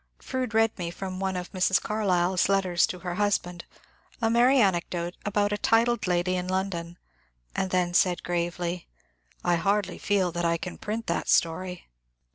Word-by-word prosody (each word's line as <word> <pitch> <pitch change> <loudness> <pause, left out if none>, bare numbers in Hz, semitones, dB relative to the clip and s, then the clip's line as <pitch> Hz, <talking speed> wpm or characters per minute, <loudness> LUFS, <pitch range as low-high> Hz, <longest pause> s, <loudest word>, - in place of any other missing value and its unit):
Fronde 255 -4 -4
read 225 0 +3
me 170 -1 -2
from 185 +1 -6
one 190 -1 -1
of 180 0 -6
Mrs. 190 0 +2
Carlyle's 185 -4 +1
letters 185 -3 +3
to 180 - -5
her 180 -1 -3
husband 180 -4 -1 0.5
a 225 -2 +1
merry 245 +4 +5
anecdote 175 -3 0
about 205 0 +1
a 205 - -1
titled 235 -1 +2
lady 180 +1 +1
in 180 0 -2
London, 185 -2 -3 0.6
and 190 - 0
then 180 -1 +1
said 180 0 +2
gravely, 175 0 -2 0.2
^^ - - -38
I 175 -1 +2
hardly 200 +3 0
feel 195 -4 +1
that 175 +1 -3
I 170 0 +2
can 180 +2 -7
print 225 +2 -4
that - - -2
stoiy." 180 +2 +1
185 Hz, 170 wpm, -27 LUFS, 175-205 Hz, 0.6 s, merry